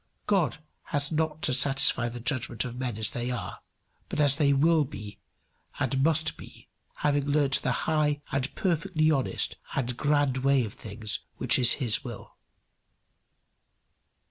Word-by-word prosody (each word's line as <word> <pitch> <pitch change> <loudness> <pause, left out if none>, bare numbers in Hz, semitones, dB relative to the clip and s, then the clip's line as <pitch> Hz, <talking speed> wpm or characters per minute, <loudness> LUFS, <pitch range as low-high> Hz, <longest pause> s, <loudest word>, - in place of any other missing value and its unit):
God 190 -8 +1 0.3
has 145 +1 -1
not 155 0 -1
to 130 - +3
satisfy 135 -2 +2
the 120 +1 -7
judgment 120 -2 -2
of 120 -1 -6
men 125 -4 -4
as 110 -1 0
they 120 0 -3
are, 125 -3 -5 0.5
but - - -4
as 145 -2 +4
they 145 -3 +3
will 155 +3 +3
be 105 -7 -9 0.6
and 135 -1 0
must 160 0 +2
be, - - -14 0.3
having 145 -1 0
learned 145 -2 +1
the 125 - 0
high 150 -2 +1
and 135 0 -2
perfectly 165 -3 +1
honest 135 -4 -1 0.2
and 125 -2 -1
grand 145 -3 +1
way 135 -1 +2
of 105 - -8
things 105 0 -4 0.2
which - - +2
is 120 -1 +7
his 120 -7 +1
will. - - -9
140 Hz, 150 wpm, -27 LUFS, 125-150 Hz, 0.6 s, is